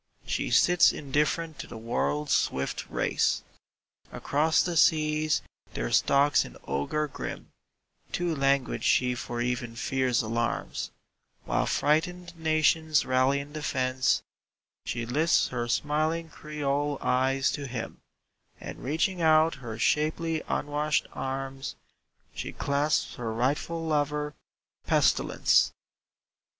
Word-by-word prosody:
She - - -2
sits 175 0 +5
indifferent 150 +2 -1
to - - -6
the - - -9
world's 140 +6 -1
swift 65 0 -1
race. - - 0 0.7
Across 155 +3 +2
the 175 -1 -2
seas 155 -1 +3 0.3
there - - -2
stalks 140 +1 +4
an - - -11
ogre 70 - -1
grim: 140 - -7 0.6
Too 175 -2 -1
languid 135 -1 +1
she 125 -1 +3
for 120 -1 -4
even 120 -1 -2
fear's 125 0 0
alarms, 115 +2 -2 0.6
While - - 0
frightened 175 +4 0
nations 160 -1 +2
rally 130 +2 +2
in 140 +1 -8
defence, 130 -4 0 0.6
She 120 0 -3
lifts 150 +8 +2
her 120 -1 -3
smiling 155 +5 0
Creole 145 -1 -2
eyes 130 +1 +1
to 145 -1 -4
him, 120 -2 -6 0.6
And - - -8
reaching 165 +6 0
out 160 0 +5
her 115 -3 -6
shapely 155 +5 +1
unwashed 150 0 0
arms, 135 0 -4 0.6
She - - -5
clasps 145 +2 0
her 115 -2 -3
rightful 145 +8 -1
lover 150 -1 0 0.5
Pestilence. - - +3
145 Hz, 115 wpm, -28 LUFS, 130-155 Hz, 0.7 s, sits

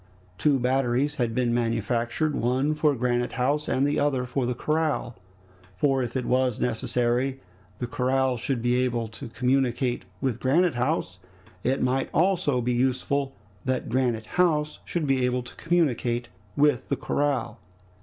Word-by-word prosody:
Two 145 -3 +3
batteries 130 +3 +1
had 115 -2 0
been 125 -2 +1
manufactured, 120 +5 0
one 130 +5 +1
for 150 -1 +2
Granite 120 0 0
House, 145 +4 0
the 140 +3 +1
other 135 -3 +1
for 125 0 -1
the 125 - -1
corral; 155 -4 -1 0.6
for 135 +3 +2
if 120 0 -4
it 125 - -2
was 125 -2 +1
necessary 125 +2 0 0.4
the 125 - -3
corral 130 +2 +1
should 120 0 -2
be 125 +1 +2
able 120 -2 -1
to 120 +5 -8
communicate 125 0 0
with 130 -2 -1
Granite 165 +6 +3
House 120 - -1 0.4
it 130 +2 +1
might 130 +1 0
also 165 -6 +2
be 125 +1 0
useful 135 +2 0 0.3
that 130 -1 -1
Granite 120 -3 0 0.2
House 150 -4 +1
should 170 -3 -2
be 135 -2 +2
able 125 0 0
to - - -9
communicate 125 -8 0 0.3
with 145 -3 +2
the - - 0
corral. 135 -5 -1
130 Hz, 150 wpm, -26 LUFS, 120-140 Hz, 0.6 s, Two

